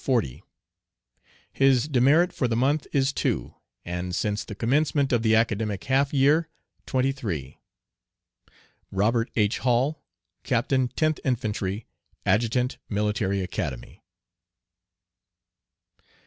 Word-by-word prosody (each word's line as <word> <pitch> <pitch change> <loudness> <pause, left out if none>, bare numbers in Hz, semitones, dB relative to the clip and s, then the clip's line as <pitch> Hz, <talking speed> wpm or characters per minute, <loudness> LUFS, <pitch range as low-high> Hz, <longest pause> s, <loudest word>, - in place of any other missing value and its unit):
40 115 - 0 1.1
His 135 0 +3
demerit 150 +6 +3
for 125 - 0
the 115 - -1
month 140 +5 +1
is 135 -1 +1
2, - - -1 0.3
and 90 +1 -3
since 105 -1 -1
the 105 - -8
commencement 140 +4 +1
of 120 - +3
the 110 -1 +3
academic 110 -3 0
half 135 +1 +1
year, 150 +4 +3 0.4
23. 125 - -2 1.3
Robt. 115 +4 +1
H. 105 -2 +1
Hall, 130 +4 +1 0.4
Captain 130 +1 +1
10th 155 +5 0
Infantry, 105 -5 -2 0.4
Adjutant 120 +5 +1
Military 105 -1 0
Academy. 65 -8 -5
120 Hz, 100 wpm, -25 LUFS, 105-135 Hz, 1.3 s, His